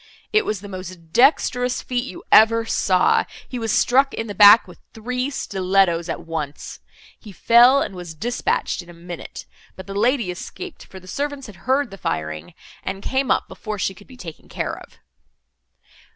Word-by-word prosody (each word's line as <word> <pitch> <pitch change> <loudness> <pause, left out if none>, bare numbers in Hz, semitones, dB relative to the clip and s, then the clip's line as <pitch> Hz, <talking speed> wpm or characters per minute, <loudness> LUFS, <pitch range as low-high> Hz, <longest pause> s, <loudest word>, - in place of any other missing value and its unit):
It 430 0 +3
was 210 -3 -2
the 205 - -9
most 185 -4 -9
dexterous 250 -1 +3
feat 250 0 -2
you 185 - -9
ever 225 +1 +6
saw—he 200 +4 0
was 225 -2 -2
struck 270 +5 +3
in 225 - -3
the 205 - -6
back 205 +2 +8
with - - -14 0.2
three 250 +4 -3
stillettos 185 - 0
at 165 - -5
once. 155 -3 -6 0.4
He 210 - -12
fell, 240 +7 +5
and - - -6
was 175 -3 -8
dispatched 235 +1 -1
in 175 - -16
a - - -11
minute; 170 0 -9 0.3
but 190 - -10
the 195 - -7
lady 230 -1 +1
escaped, 350 - -9
for 190 - -11
the 185 - -17
servants 285 +5 -4
had 210 - -11
heard 275 -2 +2
the 195 - -10
firing, 80 - -4 0.3
and 195 +1 -5
came 265 0 -1
up - - +1
before 215 -2 -6
she 195 - -1
could 205 +2 -17
be 255 - -14
taken 165 -9 -11
care - - -3
of. - - -16
205 Hz, 180 wpm, -21 LUFS, 180-250 Hz, 0.4 s, back